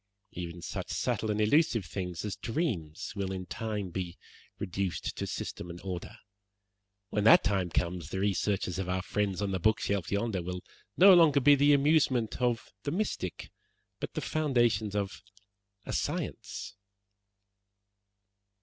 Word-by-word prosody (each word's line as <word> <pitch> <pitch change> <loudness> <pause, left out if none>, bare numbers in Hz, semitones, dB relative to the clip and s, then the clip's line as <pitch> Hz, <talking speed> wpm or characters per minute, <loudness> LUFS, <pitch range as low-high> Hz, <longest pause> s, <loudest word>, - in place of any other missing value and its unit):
Even 85 -1 -6
such - - -5
subtle 110 - -1
and 105 0 0
elusive 115 - +3
things 90 +2 -4
as 105 - -3
dreams 110 - -3
will 100 -2 -2
in 95 -1 -4
time 105 -1 -4
be 90 -1 -4 0.4
reduced 95 -2 -3
to - - -3
system 90 - -5
and 85 +1 -7
order. 95 +4 -5 0.9
When 105 - 0
that 115 - +8
time 95 -3 +1
comes 85 -1 -2
the 95 - -3
researches 95 -2 0
of 95 -1 -3
our 90 0 -1
friends 100 -1 -1
on 100 - -1
the 95 - -1
bookshelf 100 -1 +1
yonder 100 -2 0
will 90 +1 -5 0.3
no 195 +1 +9
longer 160 -5 +6
be 145 +2 +7
the 145 +1 +5
amusement 140 -5 +2
of 120 -2 0
the - - -3
mystic, 165 - -3 0.5
but - - -5
the - - -1
foundations 120 -8 +1
of 100 -1 -2 0.6
a - - -4
science." 100 +2 -3
100 Hz, 145 wpm, -30 LUFS, 90-120 Hz, 0.9 s, no